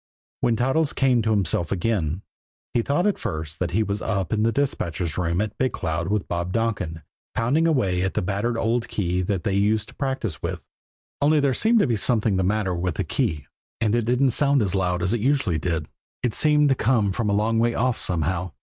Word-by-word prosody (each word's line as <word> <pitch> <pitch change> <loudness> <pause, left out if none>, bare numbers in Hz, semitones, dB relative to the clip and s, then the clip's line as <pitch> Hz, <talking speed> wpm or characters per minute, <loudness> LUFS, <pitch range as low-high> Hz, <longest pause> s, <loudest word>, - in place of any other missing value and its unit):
When 120 -2 +2
Toddles 135 +6 +1
came 130 -3 +3
to 110 - -1
himself 95 -6 +1
again, 95 -3 -1 0.5
he 120 - +2
thought 145 - 0
at 210 - +1
first 80 0 -5
that 90 - -1
he 110 +7 +1
was 100 0 -3
up 100 -2 -1
in 105 - +1
the 115 +1 +3
dispatcher's 90 - -2
room 85 -1 0
at 105 -1 -3
Big 130 0 +1
Cloud 80 +1 -2
with 105 0 -1
Bob 85 +1 -2
Donkin 95 -8 -2 0.3
pounding 140 +9 +2
away 95 - +1
on 95 - +1
the - - 0
battered 105 +5 -1
old 115 +1 0
key 90 -2 -1
they 95 +1 -1
used 105 +2 +1
to - - -14
practice 130 - -3
with - - -4 0.6
only 150 +2 +4
there 140 -2 +2
seemed 225 - +3
to - - +3
be 120 -4 +1
something 110 -1 +2
the 95 - +1
matter 100 0 0
with 90 -1 -2
the - - -1
key, 75 -3 -1 0.3
and 110 -2 +1
it 120 -2 +1
didn't 125 +3 +2
sound 140 0 +2
as 95 -2 -2
loud 90 -2 0
as 95 +4 +1
it 120 - -1
usually 125 - +1
did 80 -2 -2 0.4
it 120 -3 0
seemed 150 +1 +4
to - - +5
come 115 -5 +1
from 105 +2 -1
a - - +1
long 110 +2 +1
way 115 0 +1
off 125 +1 +1
somehow. 85 +1 -1
105 Hz, 215 wpm, -24 LUFS, 90-125 Hz, 0.6 s, to